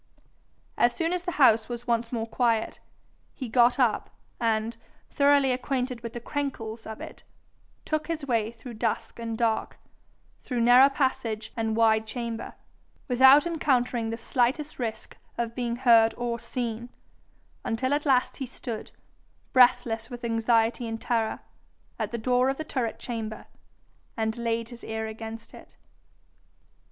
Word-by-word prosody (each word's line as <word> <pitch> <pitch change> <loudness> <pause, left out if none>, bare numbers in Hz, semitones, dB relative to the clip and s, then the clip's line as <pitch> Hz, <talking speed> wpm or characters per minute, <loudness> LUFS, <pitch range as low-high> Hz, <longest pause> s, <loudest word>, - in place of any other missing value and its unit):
As 240 0 +4
soon 330 0 0
as 360 - -1
the 355 0 -4
house 230 -5 +4
was 240 0 -5
once 235 -1 0
more 230 -2 -2
quiet, 230 -1 0 0.6
he 260 - -5
got 240 +1 +4
up, 245 -5 +1 0.3
and, 225 0 0 0.4
thoroughly 280 -2 +4
acquainted 250 -1 -2
with 230 -1 -6
the 240 - -5
"crenkles" 235 -5 -4
of 220 0 -7
it, - - -9 0.6
took 310 -1 -1
his 320 -3 -3
way 230 -5 +1
through 235 +1 -10
dusk - - -2
and 230 -1 -4
dark, 225 -1 0 0.6
through 245 -3 -2
narrow 245 +3 +7
passage 235 -6 -2
and 225 -1 -1
wide 220 -1 +3
chamber, 230 -1 -5 0.5
without 265 +3 +7
encountering 250 -8 0
the 225 - -3
slightest 255 +6 -1
risk 225 -3 -5 0.2
of 235 -1 -2
being 235 -1 -2
heard 230 -3 +5
or 240 -1 -2
seen, 240 -1 -4 0.7
until 260 +4 -1
at 290 0 0
last 265 -4 +2
he 265 - -4
stood, 235 -3 -6 0.6
breathless 240 -3 +4
with 245 0 -8
anxiety 230 +1 +1
and 225 0 -4
terror, 225 -2 -1 0.6
at - - -1
the 235 - -2
door 250 +3 +2
of 270 - -1
the 315 - -3
turret 255 -7 -2
chamber, 225 -3 -5 0.7
and 220 0 -1
laid 230 -1 -2
his 240 -1 -12
ear 220 0 -3
against 225 +1 -8
it. - - -15
235 Hz, 145 wpm, -27 LUFS, 225-255 Hz, 0.7 s, narrow